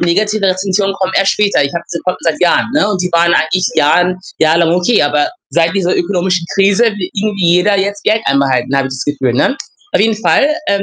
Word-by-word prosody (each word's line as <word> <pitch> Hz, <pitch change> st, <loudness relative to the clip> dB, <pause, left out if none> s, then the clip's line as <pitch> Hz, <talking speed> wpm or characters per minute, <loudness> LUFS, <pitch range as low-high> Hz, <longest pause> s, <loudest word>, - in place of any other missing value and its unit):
negativen 210 Hz, +4 st, 0 dB
Rezensionen 195 Hz, +1 st, -1 dB
kommen 190 Hz, -1 st, -2 dB
erst 195 Hz, -, +3 dB
später. 205 Hz, -7 st, +1 dB
Ich 140 Hz, -, -3 dB
habe 170 Hz, 0 st, -4 dB
die 170 Hz, -, -3 dB
Konten 180 Hz, 0 st, -3 dB
seit 165 Hz, -2 st, -1 dB
Jahren, 175 Hz, +4 st, +2 dB
ne? 305 Hz, -7 st, +2 dB
Und 195 Hz, -3 st, -2 dB
die 180 Hz, -, -2 dB
waren 170 Hz, 0 st, +3 dB
eigentlich 180 Hz, +4 st, +1 dB
jahren 180 Hz, +5 st, +2 dB, 0.2 s
jahrelang 165 Hz, +1 st, +2 dB
okay, 180 Hz, +6 st, +2 dB
aber 145 Hz, 0 st, 0 dB, 0.2 s
seit 165 Hz, 0 st, +1 dB
dieser 185 Hz, -2 st, 0 dB
ökonomischen 180 Hz, -1 st, -1 dB
Krise 195 Hz, +3 st, +2 dB
will 205 Hz, -5 st, -2 dB
irgendwie 200 Hz, -2 st, -2 dB
jeder 200 Hz, +2 st, +2 dB
jetzt 200 Hz, +1 st, -3 dB
Geld 220 Hz, +1 st, +1 dB
einbehalten, 135 Hz, -2 st, 0 dB
habe 135 Hz, 0 st, 0 dB
ich 130 Hz, -, -6 dB
das 130 Hz, -, -5 dB
Gefühl, 135 Hz, -4 st, -1 dB
ne? 275 Hz, -, +1 dB, 0.4 s
Auf -, -, +2 dB
jeden 220 Hz, +1 st, +1 dB
Fall, 280 Hz, -, +3 dB, 0.2 s
ähm, 200 Hz, 0 st, 0 dB
180 Hz, 215 wpm, -13 LUFS, 165-200 Hz, 0.4 s, erst